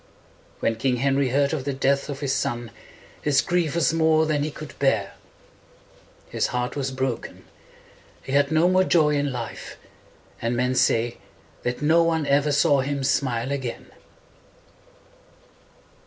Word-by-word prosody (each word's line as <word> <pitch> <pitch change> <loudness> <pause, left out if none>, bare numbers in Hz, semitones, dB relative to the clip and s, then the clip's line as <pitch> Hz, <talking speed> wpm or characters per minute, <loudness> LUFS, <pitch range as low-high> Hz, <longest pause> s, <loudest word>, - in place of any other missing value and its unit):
When 115 - 0
King 125 +2 +1
Henry 135 +1 +1
heard 140 +3 +1
of 145 -4 -2
the 140 +1 -2
death 140 +1 +1
of 140 0 -5
his 135 -2 0
son 120 -4 -2 0.5
his 145 -2 +2
grief 175 -3 0
was 170 -1 +2
more 160 -1 +3
than 155 -2 0
he 150 - -1
could 155 0 -9
bear. 110 -8 +1 1.1
His - - -1
heart 125 0 -3
was 135 -2 -2
broken. 130 -2 -4 0.8
He - - -7
had 140 +1 +2
no 160 +2 +4
more 185 +1 +4
joy 160 -5 +3
in 145 -1 0
life; 120 -3 -7 0.6
and 115 +1 -1
men 125 +1 +1
say 120 -2 +1 0.4
that 125 +4 -3
no 160 +3 +4
one 165 -2 +1
ever 140 +1 +2
saw 145 -1 +3
him 140 +1 -3
smile 130 -2 0
again. 130 -4 -5
140 Hz, 150 wpm, -24 LUFS, 130-150 Hz, 1.1 s, no